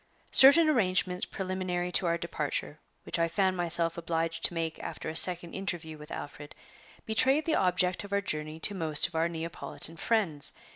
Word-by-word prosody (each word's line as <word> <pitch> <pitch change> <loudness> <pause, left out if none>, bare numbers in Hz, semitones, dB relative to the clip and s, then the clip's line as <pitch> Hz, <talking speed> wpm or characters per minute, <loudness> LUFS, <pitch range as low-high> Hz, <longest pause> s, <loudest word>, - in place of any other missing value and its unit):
Certain 285 +5 +7
arrangements 185 -8 +2
preliminary 185 -2 -3
to 180 - +1
our 170 0 +1
departure, 150 -2 -4 0.2
which - - -2
I 165 - +2
found 190 +2 0
myself 170 -1 -1
obliged 165 0 -3
to 175 - -1
make 165 -1 -3
after - - -6
a 160 - -6
second 175 0 +5
interview 175 -5 -4
with 150 0 -13
Alfred, 145 0 -9 0.5
betrayed 265 +7 +2
the 320 - +1
object 180 0 +1
of 200 - -11
our 200 - +1
journey 155 -4 -4
to 205 - 0
most 160 -5 +3
of - - -16
our 165 +1 0
Neapolitan 165 0 -7
friends. 175 -9 +2
175 Hz, 175 wpm, -29 LUFS, 165-190 Hz, 0.5 s, Certain